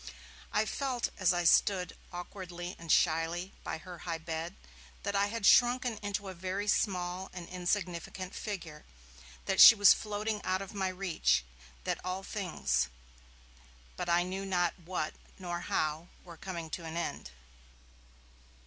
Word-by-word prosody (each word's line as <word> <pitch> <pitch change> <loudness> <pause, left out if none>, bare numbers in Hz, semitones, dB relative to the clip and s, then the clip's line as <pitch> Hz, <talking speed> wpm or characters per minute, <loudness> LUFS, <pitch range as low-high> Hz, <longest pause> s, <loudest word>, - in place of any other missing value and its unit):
I - - +2
felt, 260 -4 -1
as 185 -3 +4
I 175 -1 0
stood, 180 +2 +3 0.2
awkwardly 175 0 -7
and 165 -2 -3
shyly, 170 +3 +2
by - - -3
her 175 +1 -10
high 170 -1 -3
bed, 165 +2 -5 0.5
that 200 0 -2
I 200 0 +3
had 225 -1 -3
shrunken 245 -1 +5
into 205 -1 -3
a 190 - -5
very 185 +3 -3
small 185 -2 0
and 175 -2 -7
insignificant 180 0 -3
figure, 170 -8 -6 0.6
that - - +3
she - - +12
was 205 -1 +8
floating 210 0 -3
out 185 0 0
of 195 - -10
my 195 -2 0
reach, 185 - +1 0.4
that - - -2
all 185 +1 -3
things, 195 -4 -1 1.1
but 175 - -4
I 170 +1 +4
knew 190 +2 -4
not 180 -3 +1
what 165 -2 -3 0.2
nor 175 -2 -4
how, 155 0 -1 0.2
were 170 -1 -11
corning 170 -2 -6
to 170 - -5
an 160 +1 -5
end. 170 - -3
180 Hz, 150 wpm, -32 LUFS, 170-200 Hz, 1.1 s, she